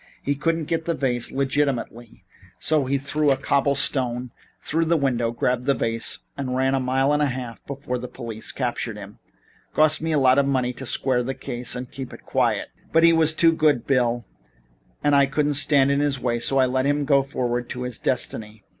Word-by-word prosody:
He 140 - 0
couldn't 165 +3 -1
get 165 0 -2
the 170 - -1
vase 125 -4 -1
legitimately, 135 -4 -2 0.3
so 155 -3 +1
he 140 +2 0
threw 145 +2 0
a 135 - +3
cobble 140 +1 +1
stone 125 -3 +1 0.3
through 165 +2 -1
the 165 +1 +2
window, 125 -5 0
grabbed 125 +1 -1
the 140 0 +2
vase 115 0 -2
and 130 -2 -3
ran 130 +1 +1
a 135 - +1
mile 135 +2 +1
and 150 - +1
a 145 - +3
half 125 -3 -6
before 135 -2 -4
the 125 - -6
police 115 -3 -7
captured 120 -4 -3
him. 100 0 -11 0.6
Cost 155 0 +4
me 165 0 -2
a 155 - +2
lot 130 -1 +4
of 140 - +2
money 130 -2 0
to 130 +1 -7
square 130 -1 +2
the 130 +2 -4
case 125 -2 -2
and 125 0 -6
keep 135 -2 -7
it - - -12
quiet. - - 0 0.2
But 165 0 +4
he 170 0 +7
was 160 -1 +4
too 165 0 +5
good, 150 -6 +1
Bill, 120 -3 +1 0.8
and 145 -1 +3
I 140 -1 +5
couldn't 145 +2 0
stand 140 -1 +3
in 140 - +1
his 145 -2 +1
way; 120 -2 -1
I 135 -1 +3
let 130 +1 0
him 145 0 +1
go 140 -1 +4
forward 125 -3 -3
to 125 - -5
his 125 -2 -5
destiny. 110 -4 -2
135 Hz, 205 wpm, -23 LUFS, 125-145 Hz, 0.8 s, he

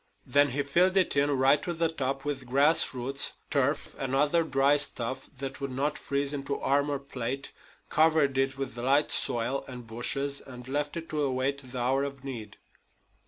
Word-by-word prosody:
Then 145 0 +4
he 140 +3 -1
filled 180 +7 +3
it 185 -5 +3
in 140 +1 +3
right 135 +3 +4
to 175 - -3
the 165 0 +1
top 135 -3 -3
with 135 -3 -3
grass 140 +5 +4
roots, 135 +3 0 0.2
turf, 140 +1 0
and 135 -1 -1
other 150 +4 +3
dry 140 -1 +3
stuff 130 -2 -1
that 135 +1 -6
would 140 - -2
not 140 +4 -1
freeze 140 -1 -2
into 140 0 -3
armor 140 +1 +1
plate, 135 -1 -5 0.4
covered 155 -3 +3
it 135 0 +1
over 135 - -9
with 130 -3 -4
light 135 +5 +2
soil 120 +3 0
and 125 -2 -8
bushes, 135 +5 -2
and 125 -1 -11
left 145 +3 -2
it 165 0 -6
to 155 -1 -1
await 135 0 0
the 130 - -6
hour 130 +3 +1
of 140 -1 -6
need. 115 -6 -7
140 Hz, 185 wpm, -28 LUFS, 130-145 Hz, 0.4 s, Then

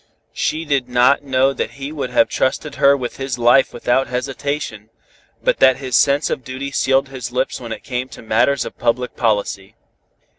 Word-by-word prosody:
She 160 +1 -2
did 135 -4 0
not 125 +3 +4
know 135 -1 +1
that - - -4
he 140 +1 -5
would 145 -4 -4
have 125 -2 +3
trusted 140 +3 -1
her 140 0 +6
with 125 -2 -5
his 135 -2 -3
life 120 +3 +4
without 125 +2 0
hesitation, 125 -3 -4 0.5
but - - +1
that 130 -1 +5
his 130 -3 -3
sense 140 +2 +3
of 135 - -3
duty 130 +3 -6
sealed 135 0 +1
his 125 -4 -6
lips 130 +1 -2
when 115 -2 -7
it 110 - -6
came 130 -1 -4
to - - -12
matters 120 +4 +2
of - - -9
public 125 +1 -1
policy. 105 -2 -1
130 Hz, 185 wpm, -19 LUFS, 120-140 Hz, 0.5 s, her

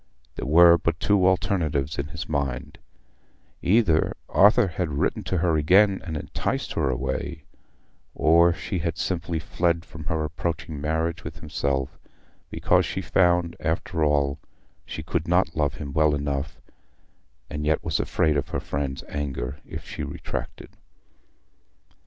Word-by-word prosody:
There - - -5
were 85 +3 +7
but 85 0 -1
two 100 -3 +3
alternatives 80 -7 0
in 70 - -2
his 80 +1 -7
mind: 70 -5 -3 0.8
either 95 -6 +3
Arthur 105 +3 +5
had 85 0 -2
written - - 0
to 95 - -1
her 85 -2 +2
again 95 +6 +4
and 80 -4 -4
enticed - - -3
her 70 - 0
away, 65 +3 -3 0.7
or 85 +2 +5
she 90 +1 -3
had 85 -1 -2
simply 85 -1 -2
fled 85 0 0
from 80 -2 -10
her 80 0 -1
approaching 80 -1 -4
marriage 80 +2 -1
with - - -7
himself 70 -1 -2 0.5
because - - +2
she - - -3
found, 90 -2 +2
after 80 +1 -1
all, 70 -1 +1 0.5
she 80 - -6
could 85 0 -2
not 90 +2 +2
love 75 -3 0
him 70 -2 -7
well 75 -1 +3
enough, 70 0 -3 0.9
and 75 0 -5
yet 75 +1 +1
was - - -1
afraid 75 -2 +1
of 70 - -2
her - - -2
friends' 70 -2 -3
anger 70 -1 -4
if - - -7
she - - -6
retracted. - - -6
80 Hz, 145 wpm, -25 LUFS, 75-85 Hz, 0.9 s, were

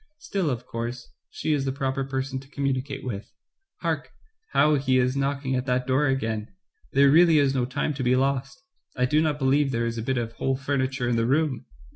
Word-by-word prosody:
Still, 195 - -2
of 125 -2 -3
course, 115 - -5 0.2
she 155 - -1
is 145 -2 0
the 135 - -1
proper 135 0 -2
person 130 0 -3
to 135 0 -15
communicate 135 -1 -2
with. 105 -5 -5 0.5
Hark, - - -2 0.4
how 150 +1 +4
he 135 -2 +2
is 125 +1 +2
knocking 140 -1 -1
at 125 +1 -2
that 125 0 +1
door 135 +3 +2
again 115 -5 -1 0.2
— - - -35
there 140 0 +6
really 165 +1 +6
is 140 -2 +3
no 130 -2 +1
time 145 +4 -2
to 140 - -5
be 125 +1 +3
lost. 135 - -1 0.3
Ijdo 130 +5 +3
not 155 -2 +1
be 135 - -2
lieve 140 +1 +3
there 115 -1 0
is 115 0 -2
a - - -2
bit 130 +3 -1
of 115 -1 -2
whole 135 +3 -1
furniture 135 -2 -1
in 120 -1 +1
the 115 0 +1
room." 140 -2 0
135 Hz, 215 wpm, -25 LUFS, 125-140 Hz, 0.5 s, there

